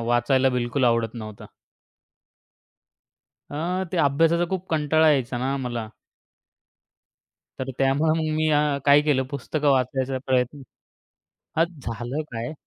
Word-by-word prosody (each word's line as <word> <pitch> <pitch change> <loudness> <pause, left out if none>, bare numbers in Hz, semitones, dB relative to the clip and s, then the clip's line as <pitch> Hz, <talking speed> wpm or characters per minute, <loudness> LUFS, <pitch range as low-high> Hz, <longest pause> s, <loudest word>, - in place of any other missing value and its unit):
वाचायला 120 +3 +2
बिलकुल 125 +1 0
आवडत 115 -1 +1
नव्हतं. 110 -3 -8 2.0
अ, 175 +6 -2
त्या 170 - +2
अभ्यासाचा 165 +5 +3
खूप 185 -1 -3
कंटाळा 155 0 +3
यायचा 130 -4 0
ना 135 +2 -1
मला. 120 -4 -4 1.7
तर 130 0 -4
त्यामुळे 135 +4 +2
मग 155 -1 -1
मी 155 0 +1 0.4
काय 145 0 +6
केलं 145 -3 +2
पुस्तकं 145 +1 -1
वाचायचा 130 0 0
प्रयत्न 130 +2 0 0.9
अ, 165 - +5
झालं 130 - -5
काय 115 +4 -4
135 Hz, 115 wpm, -24 LUFS, 125-155 Hz, 2.0 s, काय